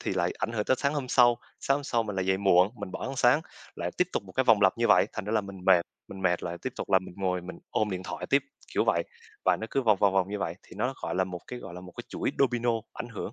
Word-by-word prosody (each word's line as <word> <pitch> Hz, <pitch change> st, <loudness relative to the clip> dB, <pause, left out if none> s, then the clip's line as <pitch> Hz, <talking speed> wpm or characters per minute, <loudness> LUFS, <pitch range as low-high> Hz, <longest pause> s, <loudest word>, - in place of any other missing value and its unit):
thì -, -, -2 dB
lại 90 Hz, -1 st, +1 dB
ảnh 115 Hz, -, -2 dB
hưởng 105 Hz, -2 st, -1 dB
tới 130 Hz, -, +2 dB
sáng 140 Hz, +1 st, +1 dB
hôm 135 Hz, -3 st, -3 dB
sau, 120 Hz, -2 st, +5 dB, 0.2 s
sáng 135 Hz, -, +2 dB
hôm 145 Hz, -, -6 dB
sau 115 Hz, -3 st, +1 dB
mình 105 Hz, -3 st, -5 dB
lại 95 Hz, -1 st, -1 dB
dậy 95 Hz, 0 st, +3 dB
muộn, 95 Hz, 0 st, +5 dB
mình 100 Hz, -, -5 dB
bỏ -, -, -5 dB
ăn 135 Hz, -, -5 dB
sáng, 125 Hz, +4 st, +5 dB, 0.4 s
lại -, -, -2 dB
tiếp 180 Hz, 0 st, +3 dB
tục -, -, -1 dB
một 95 Hz, -1 st, -13 dB
cái 130 Hz, -, +1 dB
vòng 110 Hz, -4 st, +5 dB
lặp 95 Hz, -, +4 dB
như 115 Hz, -, +2 dB
vậy. -, -, +6 dB
Thành 105 Hz, -, -5 dB
ra 105 Hz, -, -3 dB
là 110 Hz, -, +3 dB
mình 100 Hz, -2 st, -10 dB
mệt, 90 Hz, -3 st, +6 dB, 0.3 s
mình 95 Hz, -1 st, -8 dB
mệt 90 Hz, -1 st, +2 dB
lại 85 Hz, 0 st, -4 dB
tiếp 130 Hz, -, -3 dB
tục -, -, -5 dB
là 95 Hz, -, +6 dB
mình 95 Hz, -, -11 dB
ngồi 90 Hz, -2 st, 0 dB
mình 90 Hz, +1 st, -9 dB
ôm 105 Hz, -1 st, 0 dB
điện 95 Hz, -1 st, -3 dB
thoại -, -, -5 dB
tiếp, 140 Hz, 0 st, +4 dB, 0.3 s
kiểu -, -, +3 dB
vậy. -, -, +2 dB, 0.4 s
Và -, -, +4 dB
nó 110 Hz, -, -3 dB
cứ 135 Hz, -, +1 dB
vòng 105 Hz, -4 st, +4 dB
vòng 100 Hz, -2 st, +4 dB
vòng 95 Hz, -1 st, +2 dB
như 105 Hz, +1 st, -3 dB
vậy, 85 Hz, -4 st, -2 dB
thì -, -, -23 dB
nó 125 Hz, +6 st, 0 dB
gọi -, -, -2 dB
là 95 Hz, 0 st, +2 dB
một 90 Hz, -1 st, -6 dB
cái 125 Hz, -, -6 dB
gọi 85 Hz, -, -9 dB
là 90 Hz, -, -7 dB
một 90 Hz, -1 st, -11 dB
cái -, -, -6 dB
chuỗi -, -, -2 dB
domino 120 Hz, -3 st, +2 dB, 0.2 s
ảnh 120 Hz, -, -6 dB
hưởng, 105 Hz, -1 st, -6 dB
105 Hz, 315 wpm, -28 LUFS, 95-120 Hz, 0.4 s, vậy